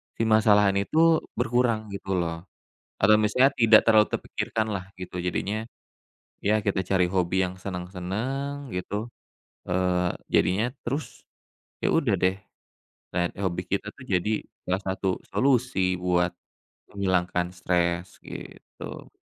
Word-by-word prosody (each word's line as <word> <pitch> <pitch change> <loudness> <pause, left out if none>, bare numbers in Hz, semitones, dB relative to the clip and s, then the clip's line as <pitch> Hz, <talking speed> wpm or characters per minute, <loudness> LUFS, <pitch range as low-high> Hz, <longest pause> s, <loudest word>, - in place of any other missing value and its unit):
si 115 - -1
masalah 105 -2 +5
ini 100 0 -1
itu 165 0 +4 0.2
berkurang 115 -3 +1
gitu 95 -1 -3
loh, 85 0 -2 0.5
atau 105 +2 +5
misalnya 125 +6 +4
tidak 115 -4 +6
terlalu 110 -2 +6
terpikirkan 110 -1 -2
lah 95 -1 -4
gitu, 90 -1 -6
jadinya, 105 +5 -2 0.8
ya 110 +1 +3
kita 100 -2 -1
cari 90 -2 +2
hobi 95 0 +1
yang 95 - -11
seneng-seneng 100 +10 -4
gitu, 105 +4 -4 0.6
eee, 90 -1 +1 0.2
jadinya 105 +7 +2 0.2
terus, 140 +4 -4 0.5
ya - - +1
udah 115 - +2
deh, 95 +1 +2 0.8
dan 85 -1 +1
hobi 90 -2 -1 0.2
kita 105 +1 -10
tuh 130 -4 -14
jadi 100 +4 +1 0.2
salah 95 +2 0
satu 95 -1 -1
solusi 125 -8 +2
buat 90 -1 +2 0.6
menghilangkan 90 -2 0
stres 90 0 0
gitu, - - -9
100 Hz, 125 wpm, -26 LUFS, 90-110 Hz, 0.8 s, tidak